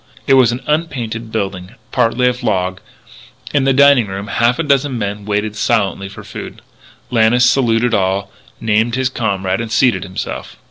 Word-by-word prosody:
It - - +3
was 130 -3 +5
an 120 +2 -4
unpainted 120 -8 -2
building, 95 -1 -4 0.2
partly 125 0 +2
of 125 0 -1
log. 95 0 -1 0.7
In 140 -2 +2
the 135 - +4
dining 140 -4 +5
room 100 +2 -6
half 120 +1 +2
a 165 - -1
dozen 140 -3 +1
men 105 -1 -4
waited 105 0 -1
silently 100 -3 0
for - - -11
food. - - -9 0.5
Lannis 120 +1 +4
saluted 120 -2 +2
all, 95 0 0 0.3
named 115 +2 +1
his 130 0 0
comrade, 100 -5 -1
and 115 -1 -6
seated 115 -4 +3
himself. 95 0 -6
115 Hz, 160 wpm, -16 LUFS, 100-125 Hz, 0.7 s, was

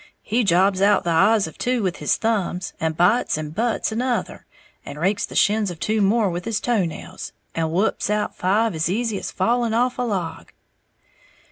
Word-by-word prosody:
He 240 +2 0
jobs 190 0 +3
out 205 0 +4
the 175 - -1
eyes 200 +5 +4
of 160 - -10
two 250 -2 0
with 185 -1 -1
his - - 0
thumbs, 200 -5 -1
and 160 -1 -2
bites 185 +2 +2
and 155 -1 -5
butts 230 +3 -1
another, 245 +2 -2 0.4
and 150 - -8
rakes 195 +5 0
the - - -11
shins 210 0 +2
of 175 -3 -8
two 215 0 0
more 205 0 +2
with 175 0 -5
his 220 -2 -1
toe 230 -6 +1
nails, 165 - -8 0.2
and 165 -1 -1
whups 190 +4 0
out 210 0 -1
five 210 +4 +1
as 160 +1 -1
easy 220 0 -1
as - - -5
falling 230 +3 0
off 250 +2 +1
a - - +1
log!" 190 -9 -4
205 Hz, 195 wpm, -22 LUFS, 175-225 Hz, 0.4 s, out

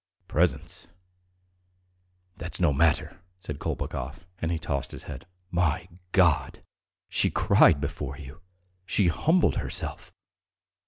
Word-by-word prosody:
"Presents... - - 0 1.5
that's 85 -2 -5
no 85 -5 +4
matter!" 80 +2 +2 0.2
said 75 -5 -6
Kolpakov, 70 +7 -4
and 80 - -1
he 85 - +1
tossed 70 -4 -3
his - - -8
head. - - -8 0.2
"My 85 -3 +1 0.2
God! 85 -6 +3 0.4
She - - +2
cried 70 - +5
before 70 -1 -4
you, 75 +3 -11 0.4
she 95 -1 +2
humbled 165 - +3
herself. - - -3
80 Hz, 110 wpm, -27 LUFS, 70-90 Hz, 1.5 s, cried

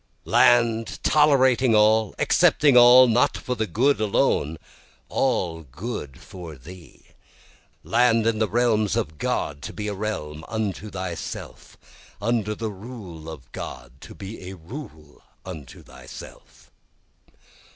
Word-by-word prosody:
6 - - -11
Land 115 -2 +3
tolerating 130 -5 +4
all, 110 0 +3
accepting 145 -4 +3
all, 125 +1 +9
not 120 +1 +2
for 125 - -4
the 110 -2 -2
good 135 +3 +1
alone, 80 -6 +1 0.5
all 85 -11 0
good 75 - -7
for 90 -5 -10
thee, 80 +2 -14 0.8
Land 115 -1 +3
in 115 -1 +1
the 110 - +1
realms 110 -4 +1
of 80 -10 -3
God 70 -1 -2
to - - -6
be 105 -1 -5
a 105 - -2
realm 95 -7 -5
unto 110 -1 -3
thyself, 95 -4 -7 0.4
Under 105 0 -1
the 110 0 -4
rule 95 -7 -10
of 80 -5 -11
God 60 -1 -8
to - - -12
be 95 -2 -8
a 95 - -8
rule 80 - -11 0.2
unto 80 -8 -10
thyself. - - -13
105 Hz, 130 wpm, -24 LUFS, 85-120 Hz, 0.8 s, all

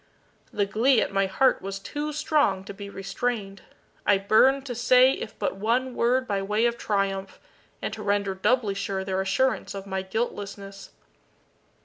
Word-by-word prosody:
The 205 - 0
glee 230 +5 +3
at - - -1
my 195 0 +2
heart 260 +8 +2
was 195 +1 -5
too 295 +9 -4
strong 290 -10 +1
to 200 - -8
be 200 0 -8
restrained. 195 0 -4 0.4
I 205 - +4
burned 255 +7 +3
to 250 - -4
say 250 +2 +5
if 220 - -6
but - - -2
one 245 +5 0
word 250 +2 +1
by 200 -1 -1
way 210 +4 +1
of 235 0 +1
triumph, 195 -3 -2 0.4
and - - -2
to 220 - -6
render 200 -1 0
doubly 210 +2 +1
sure 195 -1 -3
their 190 0 -1
assurance 260 +4 0
of 195 0 -6
my 190 -1 -3
guiltlessness. 200 -1 -5
205 Hz, 165 wpm, -26 LUFS, 195-245 Hz, 0.4 s, say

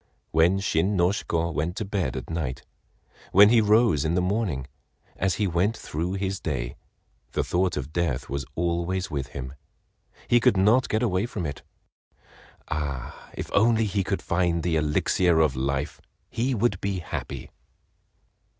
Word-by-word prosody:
When 85 +4 +4
Shin 95 +1 +1
no 85 0 +4
Shiko 85 -4 -1
went 80 +4 -1
to 110 - -2
bed 95 -10 -2
at - - -6
night, 75 -6 -3 0.7
when 100 +2 +8
he 115 0 +5
rose 105 - +4
in 80 +2 0
the - - +3
morning, 90 - -1 0.5
as 95 -2 0
he 105 - 0
went 95 +5 +1
through 85 +4 -3
his 95 -1 -2
day, 60 -6 -3 0.6
the - - +1
thought 90 -1 0
of 75 +2 -5
death 85 -8 -1
was 70 0 -3
always 85 +2 -1
with 70 -3 -2
him. 65 0 -7 0.7
He 120 - +5
could 120 -4 +3
not 110 +7 +4
get 110 +3 +1
away 100 -1 +1
from 100 -7 -4
it. 70 -2 -5 1.1
Ah—if 70 -5 -5
only 110 +1 +4
he 100 -1 0
could 95 -1 -2
find 85 -2 +1
the 85 -1 +1
"Elixir 80 +3 +2
of 75 -4 +3
Life," 70 +3 -2 0.3
he 125 +3 0
would 105 -4 0
be 100 -1 -1
happy. 70 -5 -6
90 Hz, 160 wpm, -26 LUFS, 75-100 Hz, 1.1 s, when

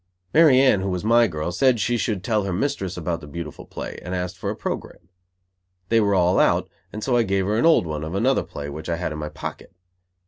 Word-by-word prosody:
Mary 155 -5 +6
Anne, 130 -8 +4
who 95 - -2
was 90 0 -3
my 115 +2 +4
girl, 80 -1 -3
said 125 +6 +3
she 120 +4 +1
should 105 -4 -1
tell 110 -2 +1
her 100 - -3
mistress 95 -3 -2
about 85 -1 -3
the 75 - -10
beautiful 75 0 -8
play; - - -7
and 90 +2 -4
asked 90 +1 -3
for - - -4
a - - -3
program. 80 - -6 0.8
They 115 - +4
were 100 -1 +2
all 90 0 +3
out, - - +3 0.2
and 110 - -6
so 130 - +1
I 120 - +4
gave 95 -3 0
her 105 +2 0
an 160 - +4
old 160 - +5
one, 75 -1 -4
of 80 +4 -5
another 130 +7 +2
play, 70 0 -7
which 75 +3 -7
I 85 - +1
had 85 -1 -3
in 75 - -5
my 75 0 -4
pocket. - - -8
95 Hz, 245 wpm, -23 LUFS, 85-115 Hz, 0.8 s, Mary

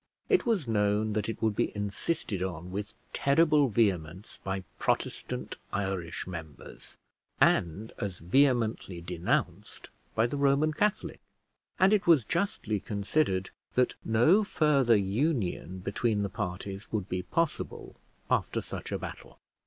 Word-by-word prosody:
It 385 - +3
was 200 - +1
known 105 0 +1
that 105 +1 -1
it 115 - -5
would 110 -2 +2
be - - +1
insisted 105 - -2
on 90 -1 -4
with 105 +3 -5 0.2
terrible 150 -1 +4
vehemence 95 -4 0
by 95 0 -3 0.2
Protestant - - -2
Irish 95 -4 -2
members, 80 -5 -9 0.4
and 95 +7 +2
as 95 -3 -3
vehemently 115 - +2
denounced 85 0 -2 0.2
by 110 - +4
the 125 +4 -2
Roman 140 +2 +3
Catholic; 210 +6 0 0.6
and 190 +2 +5
it 205 -4 +2
was 155 -9 +6
justly 145 - -1
considered 100 -1 0 0.2
that 125 0 +2
no 120 - +4
further 140 - +3
union 100 - -1
between 100 +3 0
the 100 - -2
parties 95 +2 -5
would 105 -4 -2
be 90 -1 -2
possible 165 - -2 0.3
after - - +1
such - - -6
a - - 0
battle. - - -9
105 Hz, 130 wpm, -29 LUFS, 95-140 Hz, 0.6 s, was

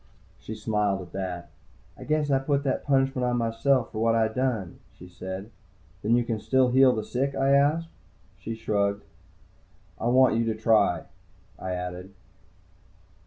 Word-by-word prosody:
She 110 - -7
smiled 105 -3 0
at 85 - -14
that. 90 -2 -5 0.4
"I - - -11
guess 150 -1 0
I 135 - +4
put 140 +1 0
that 135 -2 -1
punishment 135 -2 +1
on 125 0 +1
myself 115 +2 +1
for 110 - -5
what 115 0 +3
I 110 -1 +2
done," 110 -6 -2 0.2
she 90 - -12
said. 95 +4 -7 0.5
"Then 110 +3 +2
you 120 - +2
can 115 -2 -3
still 130 +2 +2
heal 130 0 +5
the 110 - -2
sick?" 135 +2 -2
I 135 0 +2
asked. 150 +4 +3 0.5
She 115 - -5
shrugged. 100 -2 -1 1.0
"I 115 - -1
want 125 -1 +4
you 115 - +1
to 110 -1 -1
try," 105 -7 +3 0.6
I 95 - -4
added. 90 +2 -6
115 Hz, 165 wpm, -26 LUFS, 100-130 Hz, 1.0 s, heal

